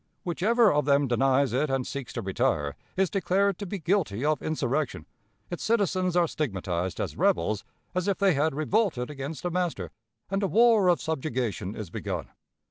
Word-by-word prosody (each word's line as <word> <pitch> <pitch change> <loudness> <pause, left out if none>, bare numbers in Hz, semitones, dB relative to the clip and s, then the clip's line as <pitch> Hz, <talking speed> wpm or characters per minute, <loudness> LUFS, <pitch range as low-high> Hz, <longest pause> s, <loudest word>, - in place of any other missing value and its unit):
Whichever 210 +6 +3
of 150 -1 +1
them 140 0 +3
denies 135 +2 +2
it 140 +4 +1
and 135 -1 0
seeks 140 -4 -5
to 115 - -4
retire, 75 -6 0 0.2
is 190 -2 +2
declared 195 0 +1
to 200 - -5
be 200 - -3
guilty 160 - 0
of 155 0 +1
insurrection, 155 -2 -1 0.5
its 175 - -4
citizens 185 -5 +1
are 175 -1 +4
stigmatized 95 - -3
as - - -3
"rebels," 95 +5 +1 0.3
as 185 +1 -1
if 200 - +1
they 195 -3 +3
had 150 +1 +1
revolted 155 - 0
against 145 +3 -6
a 175 - 0
master, 170 - -2 0.4
and 195 +1 0
a 200 - +1
war 225 -2 +5
of 175 -1 +4
subjugation 125 - -2
is 105 -6 -7
begun. - - -4
155 Hz, 175 wpm, -27 LUFS, 130-185 Hz, 0.5 s, war